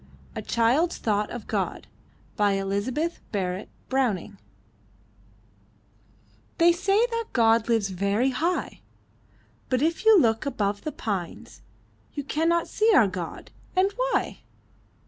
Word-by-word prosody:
A - - -3
CHILD'S 250 +9 +1
THOUGHT 210 -1 0
OF 240 -3 -7
GOD - - -2 0.5
Elizabeth 205 - 0
Barrett 190 -1 -3 0.2
Browning 210 -7 -1 2.2
They 340 -1 +6
say 390 +6 +2
that 460 0 -2
God 225 -1 +3
lives 225 -4 +2
very 200 +7 0
high! 330 +8 -2 0.9
But 255 +1 +1
if 330 +5 0
you 440 -3 +7
look 225 -6 +2
above 205 -6 -2
the 310 - -2
pines 195 - -5 0.5
You 285 - -3
cannot 330 +4 +1
see 440 +1 +2
our 225 - +6
God. 180 -3 -6 0.2
And 380 +2 +3
why? - - -1
240 Hz, 115 wpm, -26 LUFS, 205-335 Hz, 2.2 s, you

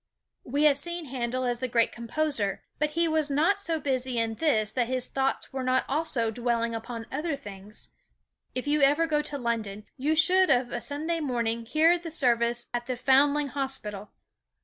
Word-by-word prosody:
We 285 +4 -1
have 290 -2 +5
seen 345 +2 -4
Handel 255 -1 -2
as 245 -1 -1
the 255 - -2
great 230 -2 +2
composer, 235 -3 -2 0.2
but 300 0 +1
he 335 0 +3
was 315 -2 +1
not 325 +9 +2
so 335 -5 0
busy 260 -3 -1
in 225 -1 0
this 220 -6 +1
that 245 -2 0
his 255 0 -1
thoughts 270 0 -2
were 265 - -3
not 255 0 +1
also 275 -6 0
dwelling 235 0 -1
upon 230 0 -6
other 300 +2 -2
things. 205 -3 -10 0.7
If 255 +3 -3
ever 295 +1 +3
you 330 - -1
go 300 -1 +2
to 295 -1 -4
London, 220 -5 -3
you 295 +4 +1
should 370 +4 +6
of 245 -1 +2
a 240 - -3
Sunday 315 +4 -2
morning 235 -5 -2
hear 325 +6 +4
the 335 -1 -7
service 240 -5 +1
at 240 0 -3
the 255 -1 -2
Foundling 280 +3 +3
Hospital. 240 -7 -5
260 Hz, 185 wpm, -27 LUFS, 235-300 Hz, 0.7 s, should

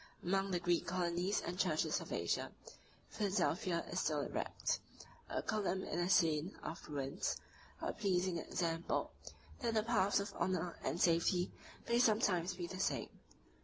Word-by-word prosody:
Among 195 +2 +1
the 180 -2 +1
Greek 175 0 +1
colonies 180 +2 +1
and 180 +2 -4
churches 160 -6 +2
of - - -8
Asia, - - 0 0.6
Philadelphia 190 -3 +1
is - - 0
still - - +1
erect; - - -1 0.5
a - - -1
column 200 -3 0
in 170 - -2
a 175 +1 +1
scene 165 -1 +3
of 165 - -6
ruins; 140 -2 -1 0.5
a - - 0
pleasing 185 -3 +1
example, 165 0 -1 0.5
that 235 -4 0
the 215 - +3
paths 205 -4 +3
of 200 +2 -4
honor 180 -2 0
and 170 - -1
safety 175 +1 +3 0.4
may 235 0 +3
sometimes 195 -6 +3
be 175 -1 -3
the 185 +2 -6
same. - - 0
180 Hz, 150 wpm, -37 LUFS, 170-200 Hz, 0.6 s, scene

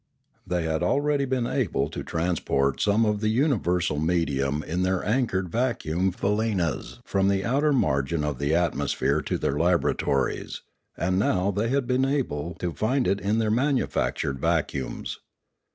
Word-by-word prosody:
They 90 -2 0
had 80 0 -1
already 140 +8 +1
been 130 -2 0
able 105 - 0
to - - -5
transport 80 -5 0
some 105 +2 +3
of 105 -1 +1
the 110 - +1
universal 90 - +1
medium 75 -3 0
in 90 +3 -2
their 95 0 0
anchored 105 -5 0
va 120 +4 +1
cuum 85 +5 0
faleenas 95 - -1
from 95 0 +1
the 100 0 +1
outer 140 +5 +2
margin 75 - +1
of 75 -4 -2
the 70 +3 +1
atmosphere 80 -3 +1
to - - -2
their 70 - -1
laboratories, 85 -5 0 0.3
aud 90 +2 0
now 95 0 +2
they 105 +4 -1
had 135 0 +1
been 130 +2 +2
able 85 - -2
to 85 -1 -3
find 125 +7 0
it 100 - +1
in 105 +3 +1
their 110 -1 +1
manufactured 125 - 0
vacuums. - - -2
95 Hz, 155 wpm, -26 LUFS, 80-115 Hz, 0.3 s, some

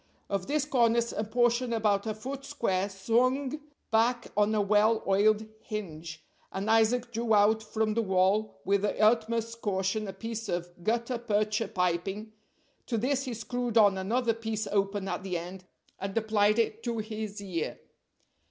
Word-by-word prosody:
Of 195 -2 -1
this 295 -1 +1
cornice 235 -4 +2
a 215 - -2
portion 240 +2 +1
about 210 -2 +1
a 215 - -2
foot 265 +5 -6
square 200 -9 -1
swung 255 +9 0 0.3
back 235 +2 +2
on 210 +1 +3
a - - +2
well 210 +2 +3
oiled 210 +2 +3
hinge, 165 -7 -7 0.3
and 200 +3 -1
Isaac 230 +2 +3
drew 230 -1 +1
out 210 +2 +4
from 220 0 -1
the 230 - +1
wall 190 0 +1
with 200 +1 +2
the 205 - -1
utmost 230 +1 +2
caution 195 +1 -1
a 195 - -5
piece 225 0 -5
of 175 0 -2
gutta 235 +4 0
percha 215 -1 0
piping, 190 +4 -2 0.5
to 235 - -1
this 270 +4 0
he 250 -3 -4
screwed 240 +1 -2
on 205 -3 +6
another 230 +5 0
piece 220 -1 -3
open 200 -1 0
at 180 -2 -3
the 185 -2 -2
end, 180 +2 -8 0.3
and 195 +2 -4
applied 215 -1 +3
it 225 -1 0
to 235 -1 -2
his 215 -1 -5
ear. 180 -5 -4
215 Hz, 160 wpm, -29 LUFS, 200-230 Hz, 0.5 s, on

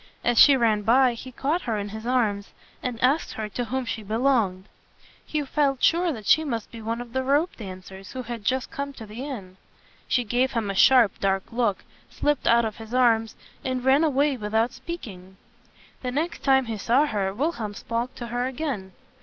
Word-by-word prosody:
As 240 -1 +3
she 280 -2 +8
ran 220 -4 +2
by, 245 +4 +4
he 255 +2 -9
caught 295 +8 -1
her 225 -4 -2
in 205 0 -4
his 220 +3 -7
arms 215 -6 0 0.3
and 245 -2 -4
asked 275 +6 +2
her 215 -1 -4
to 245 +4 -3
whom 260 +2 -2
she 225 -1 -4
belonged. 220 -3 +1 0.6
He 300 -1 -2
felt 275 -1 0
sure 345 +1 +3
that 220 -7 -7
she 315 - +5
must 230 -8 -4
be 230 - -9
one 230 +2 -3
of 240 -1 -10
the 260 - 0
rope 285 +7 +2
dan 185 -4 -8
cers 190 0 -11
who 255 -1 -5
had 235 -2 -6
just 260 +4 -1
come 280 0 -4
to 230 -4 -10
the 215 +5 -7
inn. 200 -10 -7 0.5
She 245 - +2
gave 245 +4 0
him 220 -4 -1
a - - -3
sharp, 235 0 +5
dark 195 -1 +1
look, 230 -4 0 0.3
slipped 295 0 -1
out 235 0 +5
of 215 -1 -4
his 225 +2 -7
arms, 225 -3 +3 0.3
and 255 -1 -2
ran 270 +4 +5
away 285 -2 +2
without 220 +2 0
speaking. 190 - -8 0.6
The 255 - -3
next 310 +7 -2
time 265 -1 +4
he 225 -2 -4
saw 245 +9 +3
her, 200 -8 -1
Wil 280 +12 0
helm 215 -9 -6
spoke 235 +4 -3
to 240 - -6
her 245 +1 -1
again. 255 -9 -4
240 Hz, 205 wpm, -25 LUFS, 215-265 Hz, 0.6 s, she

